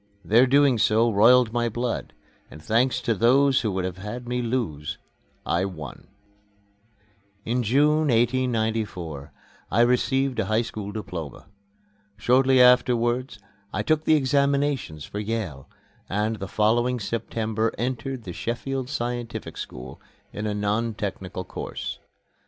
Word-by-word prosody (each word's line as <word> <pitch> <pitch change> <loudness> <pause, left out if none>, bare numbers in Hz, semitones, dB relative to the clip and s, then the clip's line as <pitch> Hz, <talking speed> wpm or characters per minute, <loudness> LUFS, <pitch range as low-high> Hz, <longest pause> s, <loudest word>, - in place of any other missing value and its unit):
Their 120 +5 +5
doing 140 -2 +4
so 110 +2 +3
roiled 115 +3 +5
my 120 -1 +1
blood, 120 +2 -3 0.4
and 75 - -11
thanks 120 +10 +1
to 115 -1 +1
those 130 +5 +4
who 110 - -1
would 95 -1 -1
have 95 0 -5
had 120 +5 -6
me 125 0 -1
lose, 115 - -3 0.5
I 85 +2 +1
won. 80 -8 -8 1.4
In 125 +2 0
June, 150 +7 +3
1894, 110 - 0 0.4
I 115 - +3
received 130 +2 +2
a - - +1
high 110 +3 +1
school 105 -3 -6
diploma. 90 -8 -7 0.7
Shortly 130 +4 +4
afterwards 125 -1 +3 0.3
I - - -2
took 155 0 0
my - - +6
examinations 140 - +1
for 105 - -6
Yale, 105 -10 -4 0.4
and 105 +3 -1
the 95 - -5
following 120 +5 +1
September 110 0 -2
entered 130 +1 -3
the 90 - -7
Sheffield 125 +5 -3
Scientific 120 -3 -4
School, 65 +1 -8 0.3
in 105 +1 -3
a 105 - -2
non 105 +2 -1
technical 95 -3 -5
course. 65 -7 -6
115 Hz, 130 wpm, -25 LUFS, 105-125 Hz, 1.4 s, my